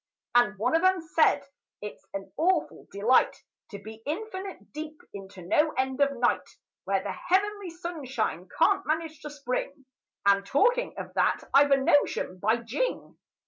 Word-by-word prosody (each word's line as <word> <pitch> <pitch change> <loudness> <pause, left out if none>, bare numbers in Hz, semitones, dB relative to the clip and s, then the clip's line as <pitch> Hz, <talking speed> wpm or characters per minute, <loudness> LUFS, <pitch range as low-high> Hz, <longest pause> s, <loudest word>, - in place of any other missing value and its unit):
And 240 -4 +4
one 245 +8 +1
of 330 - +2
'em 375 0 +4
said, 315 -3 +2 0.3
"It's 210 0 -8
an 195 0 -6
awful 340 0 0
delight 215 +6 +2 0.3
To 200 - -7
be 220 +2 -11
infinite 385 +3 -5
deep 305 0 -7
into 195 -2 -10
no 300 - +2
end 265 +1 -1
of 280 -1 +2
night, 240 0 0 0.3
Where - - 0
the - - -3
heavenly 405 +1 0
sunshine 265 - -4
can't 390 +3 +4
manage 315 0 -2
to 300 - -6
spring,— 280 0 -4 0.4
And, 200 0 +5
talking 485 - +2
of - - -7
that, - - +1
I've 285 +1 +6
a 275 - +5
notion, 275 - +1
by 220 +5 +2
Jing! 275 - -3
285 Hz, 155 wpm, -28 LUFS, 225-335 Hz, 0.4 s, I've